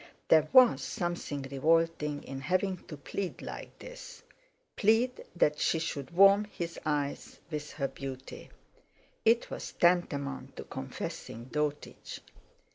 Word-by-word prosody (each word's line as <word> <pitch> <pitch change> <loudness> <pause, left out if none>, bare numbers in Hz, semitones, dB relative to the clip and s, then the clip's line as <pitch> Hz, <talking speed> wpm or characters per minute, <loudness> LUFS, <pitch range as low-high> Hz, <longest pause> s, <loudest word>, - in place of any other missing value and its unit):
There 155 -1 +6
was 255 -2 +7
something 175 -5 -3
revolting 150 +2 +1
in 135 0 -6
having 185 +4 0
to 150 - -7
plead 185 +6 -5
like - - -8
this; - - -10 0.5
plead 230 +4 +2
that 150 -3 +2
she - - +2
should 150 -4 -3
warm 195 +4 +6
his 170 -5 -6
eyes 145 -2 -2
with 150 -1 -4
her 140 -3 -1
beauty. 135 -1 -8 0.8
It 230 +1 +3
was - - -6
tantamount 145 -6 +1
to - - -6
confessing 115 +3 -6
dotage. 150 -1 -3
160 Hz, 120 wpm, -31 LUFS, 145-185 Hz, 0.8 s, was